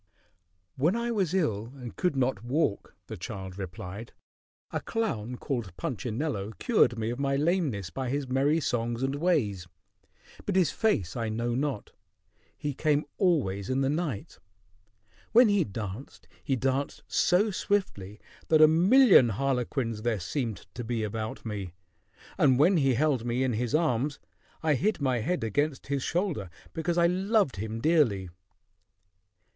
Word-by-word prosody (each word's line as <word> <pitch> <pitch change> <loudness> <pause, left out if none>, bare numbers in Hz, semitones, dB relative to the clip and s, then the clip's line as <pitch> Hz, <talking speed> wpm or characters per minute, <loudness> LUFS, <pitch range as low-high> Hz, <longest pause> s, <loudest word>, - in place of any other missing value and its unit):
"When 160 +10 +2
I 235 0 -1
was 195 -8 0
ill 115 - -1
and 125 -4 -9
could 180 -5 0
not 125 -5 0
walk," 125 -4 -1
the - - -7
child 95 -1 -7
replied, 95 +4 -7 0.6
"a - - -2
clown 125 - -2
called 120 - -4
Punchinello 115 -2 -3
cured 215 - +3
me 110 +1 -1
of 120 - -5
my 140 0 +1
lameness 145 - 0
by 130 -2 -3
his 140 +1 -2
merry 140 +5 +2
songs 120 -3 -1
and 135 +1 0
ways; 140 - 0 0.8
but 200 - -2
his 185 -3 +3
face 105 - 0
I 115 -2 -2
know 120 +2 -1
not. 135 -3 -2 0.7
He 145 -1 -3
came 150 +1 +1
always 110 - +1
in 130 +1 +1
the 135 0 +1
night. 150 - -3 0.9
When 240 0 +7
he 205 -3 +3
danced, 105 +4 -7 0.2
he 135 - 0
danced 135 +2 -1
so 205 +5 +2
swiftly 120 - -2 0.3
that 155 - +4
a 155 - +9
million 185 - +6
harlequins 125 -1 -1
there 115 -2 0
seemed 115 - -3
to 120 - -5
be 115 -1 -2
about 110 +2 -4
me: 100 -5 -5 0.7
and 130 -4 +5
when 170 +7 +5
he 135 -4 +3
held 140 -3 +1
me 120 +2 0
in 130 -2 0
his 120 +5 -1
arms, 145 -3 +1 0.5
I 155 -1 +3
hid 205 - 0
my 130 -4 +1
head 175 +9 -1
against 145 +6 -1
his 140 - 0
shoulder, 165 - -1 0.2
because 170 +1 -1
I 170 - +5
loved 190 - +2
him 110 +3 -4
dearly." 115 - +2
130 Hz, 150 wpm, -28 LUFS, 110-160 Hz, 0.9 s, a